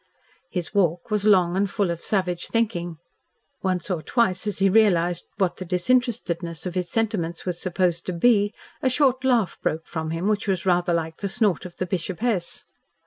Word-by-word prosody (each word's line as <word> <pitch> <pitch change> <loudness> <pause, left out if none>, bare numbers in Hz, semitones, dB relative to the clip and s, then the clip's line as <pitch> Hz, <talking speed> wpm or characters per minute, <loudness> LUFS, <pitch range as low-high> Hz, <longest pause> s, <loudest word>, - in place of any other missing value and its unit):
His 175 -3 -4
walk 175 +1 +1
was 210 -1 0
long 185 -4 +4
and 195 +1 +1
full 200 -3 0
of 170 0 -5
savage 185 -4 -1
thinking. 175 -8 -1 0.6
Once 185 0 -1
or 170 -3 -1
twice 210 0 +1
as 210 - 0
he 195 - +3
realised 180 -4 +3
what 185 -4 0
the - - -5
disinterestedness 180 - 0
of 180 - -3
his 180 -1 -2
sentiments 205 -7 -1
was 180 -2 -3
supposed 175 -2 0
to 185 - -1
be, 205 +3 +3 0.3
a 260 - +2
short 260 -1 +2
laugh 240 -7 +2
broke 160 +1 -1
from 160 -1 -4
him 165 +4 -2
which 210 -1 0
was 190 -2 0
rather 175 -1 +2
like 165 -1 -1
the 200 - -3
snort 195 -5 +1
of 175 - -16
the 185 - -1
Bishopess. 190 +2 -2
185 Hz, 185 wpm, -24 LUFS, 175-210 Hz, 0.6 s, long